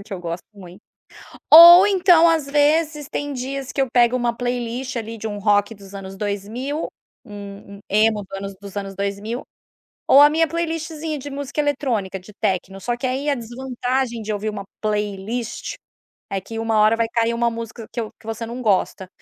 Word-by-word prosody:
um - - -10
que 215 - -11
eu 185 - -5
gosto 170 0 -5
muito, 190 -1 -13 0.7
ou 345 +4 +11
então 355 -4 +5
às 320 -4 +1
vezes 300 +1 +1
tem 290 0 -3
dias 265 +1 -5
que 275 - -3
eu 265 - -1
pego 245 0 +4
uma 240 -1 0
playlist 245 +2 -3
ali 225 0 -5
de 220 - -4
um 205 -1 -5
rock 205 +1 +2
dos 200 -1 -14
anos 195 0 -8
2000, 215 +9 -4 0.4
um 200 -2 -10
um 200 - -15
emo 215 0 +3
dos 195 0 -8
anos 195 0 -6
dos 200 0 -11
anos 195 -1 -6
2000, 200 +5 -3 0.7
ou 275 - +8
a 295 - +7
minha 325 +1 +2
playlistzinha 320 -2 -3
de 285 - -8
música 280 +1 -4
eletrônica, 245 -10 -1
de 185 +3 -15
tecno, 190 +1 -2
só 240 +4 -2
que 255 - -3
aí 265 +3 -2
a 285 - +3
desvantagem 245 0 -3
de 215 0 -3
ouvir 210 +1 -3
uma 205 -2 -5 0.2
playlist 210 +2 -3 0.6
é 195 -1 -3
que 225 +3 -7
uma 225 -1 0
hora 215 +2 +4
vai 230 -1 +1
cair 230 0 0
uma 235 0 +1
música 230 0 -7
que 240 - -5
eu 220 - -6
que 220 - -21
você 225 +1 -4
não 240 +2 -6
gosta 190 -3 0
230 Hz, 195 wpm, -21 LUFS, 205-275 Hz, 0.7 s, ou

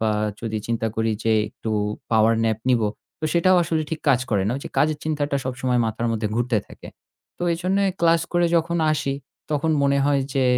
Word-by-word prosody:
বা 110 -1 +1 0.3
যদি 110 -2 -3
চিন্তা 115 -1 -1
করি 110 0 +1
যে 115 - +3 0.2
একটু 110 - -6 0.4
power 110 0 +4
nap 110 -1 +1
নিব 120 -2 +3 0.4
তো - - -3
সেটাও 180 +2 +4
আসলে 160 -1 0
ঠিক 160 - -3
কাজ 130 -3 +4
করে 100 -3 +2
না। - - +1
ওই - - -6
যে - - -5
কাজের 155 0 +2
চিন্তাটা 145 -2 -1
সবসময় 125 -1 0
মাথার 110 +2 -2
মধ্যে 110 -1 -1
ঘুরতে 120 -1 +1
থাকে। - - -12 0.5
তো - - -6
এজন্যই 190 +3 +1
ক্লাস 165 -1 +4
করে 175 0 +3
যখন 170 +1 0 0.2
আসি, 135 -2 -1 0.4
তখন 150 +2 +1
মনে 140 0 +3
হয় 140 -1 +2
যে, 135 - +2
140 Hz, 200 wpm, -23 LUFS, 115-160 Hz, 0.5 s, power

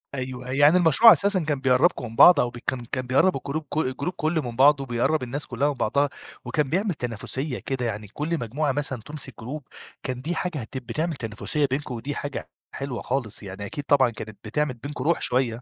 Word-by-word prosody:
أيوه، 130 -1 -5
يعني 145 +6 +5
المشروع 175 +7 +7
أساسًا 200 -2 +3
كان 150 -3 -1
بيقرِّبكم 135 +1 +2
من 115 - -11
بعض، 175 +5 +8
أو 120 - +2
ب 120 - -10
كان 125 -2 -1
كان 130 -1 -2
بيقرِّب 140 +7 +3
الجروب 145 +4 -4
كُ 150 - -5
الجروب 145 +4 -1
كلّه 160 -1 0
من 120 -4 -6
بعض، 140 +3 +5
وبيقرِّب 130 +4 0
الناس 135 +4 -4
كلها 135 +2 -1
من - - -1
بعضها، 140 +3 +1 0.4
وكان 135 +3 0
بيعمل 190 +5 0
تنافسية 125 +2 -4
كده، 130 -2 -3
يعني 105 -2 -4
كل 150 +10 -3
مجموعة 135 +6 -1
مثلًا 135 -3 -2
تمسك 145 -2 -2
جروب، 135 +6 -6 0.4
كان 125 -1 -4
دي 165 +5 -2
حاجة 175 -3 -2
هت 115 +4 -7
بتعمل 155 +8 -2
تنافسية 120 +5 0
بينكُم، 135 -2 -2
ودي 140 +5 -5
حاجة 145 -1 -5 0.3
حلوة 135 -3 -4
خالص، 120 -5 -1
يعني 100 +1 -7
أكيد 145 +8 -6
طبعًا 135 -3 +4
كانت 110 -2 -9
بتعمل 150 +5 -1
بينكم 145 0 -5
روح 170 +3 +1
شوية. 125 -2 +1
135 Hz, 205 wpm, -25 LUFS, 125-150 Hz, 0.4 s, بعض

